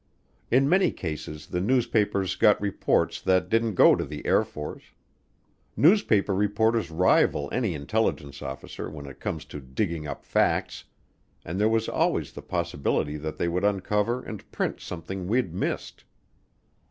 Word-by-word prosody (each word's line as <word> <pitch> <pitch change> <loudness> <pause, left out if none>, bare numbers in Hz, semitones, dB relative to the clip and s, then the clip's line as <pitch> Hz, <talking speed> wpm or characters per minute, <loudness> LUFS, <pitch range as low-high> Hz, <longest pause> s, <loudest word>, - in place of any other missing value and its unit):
In 135 +3 +4
many 185 +4 +4
cases 75 -2 -6
the 90 +2 -3
newspapers 105 -4 +1
got 105 - +4
reports 100 -1 0
that 95 0 +2
didn't 115 -2 +1
go - - +7
to - - -2
the 75 -1 -8
Air - - +4
Force. 75 0 -8 0.9
Newspaper 145 - +4
reporters 105 +3 +1
rival 80 -4 +2
any 110 -9 0
intelligence 70 -3 -2
officer 65 - -6
when 75 -2 -9
it 70 -2 -11
comes 75 -1 -4
to 75 - -8
digging 75 +4 -3
up - - -7
facts, - - 0 0.6
and 85 +4 -4
there 105 +1 +4
was 115 0 +1
always - - 0
the - - -8
possibility 75 +1 -1
that 75 +1 -5
they 85 - 0
would 90 +3 -1
uncover 105 +4 0
and 110 -4 -9
print - - -2
something 90 +2 -6
we'd 115 -5 0
missed. 95 - -3
95 Hz, 150 wpm, -26 LUFS, 75-110 Hz, 0.9 s, go